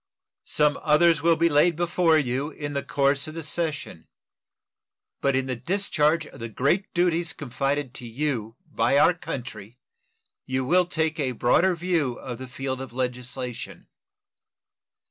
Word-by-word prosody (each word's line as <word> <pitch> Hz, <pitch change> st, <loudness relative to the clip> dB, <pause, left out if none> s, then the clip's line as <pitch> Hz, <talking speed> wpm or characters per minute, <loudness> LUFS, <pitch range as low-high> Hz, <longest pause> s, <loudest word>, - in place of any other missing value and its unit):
Some 150 Hz, -1 st, +2 dB
others 160 Hz, +1 st, +4 dB
will 165 Hz, 0 st, +4 dB
be 165 Hz, +1 st, +3 dB
laid 165 Hz, +2 st, +4 dB
before 170 Hz, -1 st, +3 dB
you 135 Hz, 0 st, -1 dB
in 145 Hz, -2 st, -6 dB
the 140 Hz, -, -1 dB
course 140 Hz, 0 st, +1 dB
of 155 Hz, -, -8 dB
the 165 Hz, -, -5 dB
session; 155 Hz, 0 st, -3 dB, 1.1 s
but 140 Hz, -1 st, +2 dB
in 130 Hz, 0 st, +1 dB
the 130 Hz, -1 st, -2 dB
discharge 160 Hz, -, +1 dB
of -, -, -13 dB
the 115 Hz, 0 st, -5 dB
great 140 Hz, -, 0 dB
duties 170 Hz, -1 st, +1 dB
confided 135 Hz, 0 st, -2 dB
to 120 Hz, -, -8 dB
you 115 Hz, -3 st, -3 dB
by 120 Hz, +5 st, +1 dB
our 165 Hz, +5 st, +6 dB
country 120 Hz, -, -7 dB, 0.7 s
you 130 Hz, 0 st, -1 dB
will 180 Hz, +5 st, +3 dB
take 160 Hz, -2 st, -1 dB
a 130 Hz, -3 st, 0 dB
broader 170 Hz, +11 st, +3 dB
view 170 Hz, -6 st, 0 dB
of 120 Hz, -1 st, -7 dB
the 130 Hz, -, -7 dB
field 130 Hz, 0 st, -4 dB
of 130 Hz, -3 st, -8 dB
legislation. 125 Hz, 0 st, -5 dB
145 Hz, 150 wpm, -25 LUFS, 125-165 Hz, 1.1 s, our